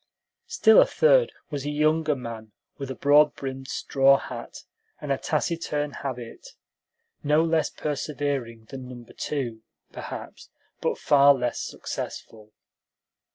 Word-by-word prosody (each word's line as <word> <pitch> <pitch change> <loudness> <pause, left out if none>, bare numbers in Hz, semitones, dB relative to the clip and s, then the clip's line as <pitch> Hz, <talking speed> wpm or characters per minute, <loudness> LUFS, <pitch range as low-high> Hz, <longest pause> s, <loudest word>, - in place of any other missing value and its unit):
Still 220 0 +6
a - - +4
third - - +4 0.2
was 145 -2 -3
a 145 - -3
younger 155 +1 +2
man, 115 -4 -8 0.3
with 135 -1 -5
a 130 - -4
broad 145 +1 +4
brimmed 135 -1 -6
straw 135 0 +3
hat - - -8 0.4
and - - -4
a - - +2
taciturn 150 -3 -1
habit; 125 -5 -7 0.7
no 150 +2 +3
less 165 -2 +1
persevering 140 -6 -3
than 130 -2 -8
Number 120 -2 -11
Two, 120 -7 -4 0.3
perhaps, - - -8 0.3
but - - 0
far 140 0 +5
less 125 -2 -2
successful. 110 -1 -7
140 Hz, 125 wpm, -25 LUFS, 125-150 Hz, 0.7 s, Still